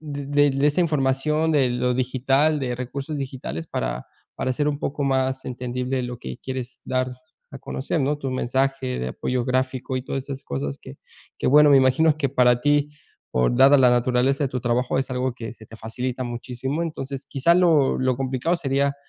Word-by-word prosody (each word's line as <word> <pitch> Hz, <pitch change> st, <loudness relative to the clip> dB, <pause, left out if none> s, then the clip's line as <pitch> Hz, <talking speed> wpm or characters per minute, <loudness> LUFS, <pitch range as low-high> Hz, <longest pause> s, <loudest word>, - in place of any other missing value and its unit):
del 145 Hz, -2 st, -6 dB
de 145 Hz, 0 st, +4 dB
de 135 Hz, +2 st, +1 dB
esa 150 Hz, +4 st, +2 dB
información, 150 Hz, +1 st, +1 dB
de 135 Hz, -5 st, +3 dB
lo 125 Hz, 0 st, 0 dB
digital, 135 Hz, +4 st, +1 dB
de 125 Hz, -2 st, -2 dB
recursos 135 Hz, +4 st, -5 dB
digitales 130 Hz, -, -5 dB
para -, -, -3 dB, 0.3 s
para 130 Hz, -, -1 dB
ser 145 Hz, +3 st, 0 dB
un 145 Hz, -, -2 dB
poco 145 Hz, 0 st, -3 dB
más 130 Hz, -1 st, 0 dB
entendible 125 Hz, +1 st, -3 dB
lo 125 Hz, 0 st, -5 dB
que 65 Hz, -1 st, -7 dB
quieres 130 Hz, -1 st, -6 dB
dar 130 Hz, 0 st, -1 dB, 0.4 s
a 135 Hz, -, -7 dB
conocer, 135 Hz, +4 st, -3 dB
¿no? 145 Hz, +2 st, 0 dB
Tu 135 Hz, -2 st, -4 dB
mensaje 130 Hz, +1 st, -1 dB
de 65 Hz, -, -2 dB
apoyo 125 Hz, -, -2 dB
gráfico 130 Hz, 0 st, -1 dB
y 130 Hz, -, -3 dB
todas 135 Hz, 0 st, -4 dB
esas 135 Hz, -1 st, -7 dB
cosas 70 Hz, 0 st, -4 dB
que -, -, -12 dB, 0.4 s
que, -, -, -2 dB
bueno, 150 Hz, +1 st, +7 dB
me 140 Hz, -, +7 dB
imagino 140 Hz, +4 st, +3 dB
que 140 Hz, -, +1 dB
para 125 Hz, -2 st, +3 dB
ti, 145 Hz, +1 st, +2 dB, 0.4 s
por, 65 Hz, -, +2 dB
dada 135 Hz, +2 st, +7 dB
la 125 Hz, -2 st, +6 dB
naturaleza 125 Hz, +3 st, +2 dB
de -, -, 0 dB
tu 125 Hz, -1 st, -3 dB
trabajo, 125 Hz, +2 st, 0 dB
es 135 Hz, -, -2 dB
algo 130 Hz, 0 st, -1 dB
que 115 Hz, -2 st, -7 dB
se 110 Hz, -, -15 dB
te 110 Hz, -, -13 dB
facilita 125 Hz, +3 st, -4 dB
muchísimo. 125 Hz, +5 st, -4 dB
Entonces 140 Hz, -4 st, -5 dB
quizá 150 Hz, +5 st, +2 dB
lo 165 Hz, -6 st, +3 dB
lo 130 Hz, 0 st, +1 dB
complicado 135 Hz, +6 st, -1 dB
sería, 140 Hz, -1 st, 0 dB
130 Hz, 195 wpm, -23 LUFS, 125-140 Hz, 0.4 s, bueno